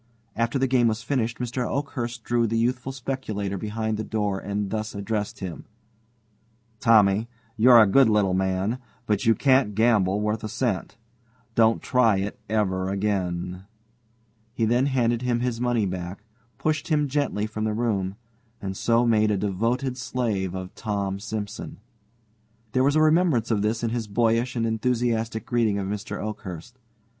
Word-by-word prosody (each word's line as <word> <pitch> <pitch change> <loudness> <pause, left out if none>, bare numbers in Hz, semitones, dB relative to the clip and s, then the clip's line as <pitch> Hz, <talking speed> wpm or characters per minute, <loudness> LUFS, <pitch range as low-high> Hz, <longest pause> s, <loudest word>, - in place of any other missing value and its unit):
After 115 +3 0
the 135 - +2
game 125 -2 +3
was 110 0 -1
finished, 120 -3 -1
Mr. 125 +1 -2
Oakhurst 120 -5 -3
drew 120 -1 +1
the 115 +1 -1
youthful 125 +3 0
speculator 125 -7 -3
behind 110 +2 -2
the 110 - -3
door 105 -3 -1
and 100 0 -3
thus 110 -1 -3
addressed 105 +1 -3
him: 90 -3 -6 1.1
"Tommy, 110 -1 +4 0.3
you're 120 +1 +7
a 110 - +8
good 120 +4 +5
little 105 -3 +2
man, 95 +5 0 0.3
but 105 -1 0
you 115 - +5
can't 130 -4 +3
gamble 105 -4 +3
worth 105 +1 -1
a 110 - -3
cent. 105 -4 -2 0.6
Don't 115 0 +3
try 115 -5 +3
it 100 +2 -3
over 95 -4 0
again." 95 -2 -2 0.9
He 115 - +1
then 120 +4 +2
handed 120 -3 +1
him 120 -1 0
his 120 -1 -2
money 120 -3 +1
back, 90 +2 -5 0.3
pushed 155 -1 -1
him 150 -2 +2
gently 140 -7 -1
from 110 0 -3
the 110 - 0
room, 100 -5 -1 0.4
and 95 -1 -5
so 115 +4 +2
made 110 -2 +3
a 105 - +1
devoted 115 +7 -1
slave 105 -8 -2
of 95 0 -6
Tom 100 -2 -3
Simson. 105 0 -5 0.9
There 130 +2 +2
was 140 +2 +3
a 155 - +4
remembrance 155 -8 +3
of 105 -3 +2
this 110 +3 -1
in 115 - 0
his 115 -2 -2
boyish 115 +4 +1
and 115 -1 0
enthusiastic 115 -1 -1
greeting 115 -4 +1
of 100 - -2
Mr. 105 +1 -4
Oakhurst. 105 +2 -7
110 Hz, 160 wpm, -25 LUFS, 100-120 Hz, 1.1 s, a